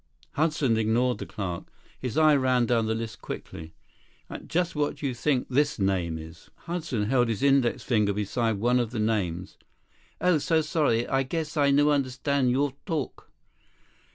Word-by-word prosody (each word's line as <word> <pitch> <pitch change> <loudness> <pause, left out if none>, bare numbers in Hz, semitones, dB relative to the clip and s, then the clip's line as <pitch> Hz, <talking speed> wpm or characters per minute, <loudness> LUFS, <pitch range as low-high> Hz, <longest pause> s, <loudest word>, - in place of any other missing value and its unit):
Hudson 150 -6 +1
ignored 115 +3 +1
the - - -6
clerk. 90 -4 -5 0.3
His 125 -4 -4
eye 155 -1 +6
ran 130 -3 +2
down 115 -2 +1
the 110 - 0
list 110 -3 -6
quickly. 80 0 -8 0.6
"And - - -8
just 175 0 0
what 150 -1 0
do - - -7
you 135 - 0
think 130 +1 0
this 145 +3 +1
name 95 -5 0
is?" 80 +1 -11 0.2
Hudson 165 -10 -2
held 120 +1 +2
his 115 +2 -2
index 135 -3 +3
finger 105 -5 +2
beside 110 +3 -1
one 120 +5 +2
of 120 -2 -1
the 115 -1 -4
names. 95 -5 -2 0.6
"Oh, 180 -3 +3
so 160 +2 +2
sorry. 150 -7 +1
I 135 - +1
guess 155 +3 -3
I 145 -2 +3
no 145 +2 +4
understand 135 -1 0
your 135 +2 +1
talk." 155 - -4
125 Hz, 170 wpm, -27 LUFS, 110-145 Hz, 0.6 s, eye